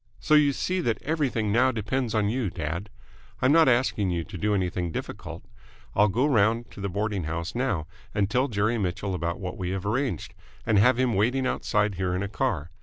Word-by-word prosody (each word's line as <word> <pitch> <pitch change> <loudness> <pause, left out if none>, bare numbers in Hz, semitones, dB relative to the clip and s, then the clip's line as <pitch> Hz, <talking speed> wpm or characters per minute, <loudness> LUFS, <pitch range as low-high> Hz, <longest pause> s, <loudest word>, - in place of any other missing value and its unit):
So 115 - 0
you 150 -2 +6
see 185 +6 -1
that 115 -8 0
everything 135 -9 0
now 130 +4 +4
depends 115 +1 -2
on 105 -2 +2
you, 115 -1 -1
dad. 85 +3 -4 0.5
I'm 130 - +3
not 160 -2 +6
asking 120 -5 +2
you 85 -2 -1
to - - -11
do 105 +4 0
anything 90 -2 -1
difficult. - - -6 0.5
I'll 105 - +4
go 120 +7 +1
round 115 -3 +2
to - - -10
the 100 - -2
boarding 100 -1 -2
house 85 +2 -3
now 120 - -1 0.3
and 100 -1 +1
tell 125 +6 +1
Jerry 110 +1 0
Mitchell 95 0 -2
about 85 -1 -2
what 90 0 -5
we 90 -1 -2
have 95 0 -3
arranged, 120 - -1 0.3
and 105 -3 +3
have 125 +4 +5
him 130 -2 +2
waiting 125 +6 +1
outside 105 -4 0
here 90 -1 -1
in 95 - -1
a - - -2
car. 85 -4 -2
105 Hz, 205 wpm, -26 LUFS, 95-125 Hz, 0.5 s, you